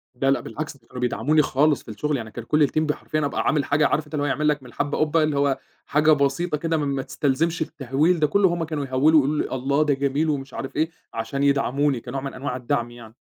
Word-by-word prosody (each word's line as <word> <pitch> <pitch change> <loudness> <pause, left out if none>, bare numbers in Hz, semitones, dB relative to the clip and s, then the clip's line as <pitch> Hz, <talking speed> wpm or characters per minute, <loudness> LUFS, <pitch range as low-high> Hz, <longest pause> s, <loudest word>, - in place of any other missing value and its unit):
لا 135 +2 +2
لأ - - +2
بالعكس، 155 -2 -6
دول 115 -3 -31
كانوا 125 -1 -8
بيدعموني 145 +5 +2
خالص 145 +1 +2
في - - -9
الشغل، 145 +7 -1
يعني 110 -3 -7
كان 120 - -7
كل 150 +4 +3
الTeam 155 - -1
ب 155 -1 +1
حرفيًا، 155 0 -2
أبقى 140 - -1
عامل 150 -2 +1
حاجة، 145 0 +3
عارف 155 +1 0
أنت 150 - -17
اللي 145 -1 0
هو - - 0
هيعمل 150 +2 0
لك 145 -2 +1
من 125 - -12
الحبة 145 +4 -2
قُبّة، 155 +1 +2
اللي 150 -2 0
هو 140 -1 +1 0.3
حاجة 150 +2 +3
بسيطة 150 +3 +1
كده 165 +1 -1
م 150 - -1
ما 140 -1 -1
تستلزمش 145 +5 -1
التهوّيل 150 +4 0
ده 150 - +3
كله، 200 +6 +3
هُم 170 -1 -2
كانوا 155 -3 -3
يهوّلوا 140 +4 +4
يقولوا 145 +2 0
لي - - -4
الله 140 +3 +1
ده 150 -2 +2
جميل 140 +3 0
ومش 140 -3 -3
عارف 135 - -6
إيه، 155 +2 +1 0.2
عشان 115 +5 -3
يدعموني، 140 -1 +2
كنوع 135 - -5
من 135 0 -5
أنواع 130 -1 -4
الدعم 120 -1 -2
يعني، 115 -2 -13
145 Hz, 255 wpm, -23 LUFS, 135-155 Hz, 0.3 s, يهوّلوا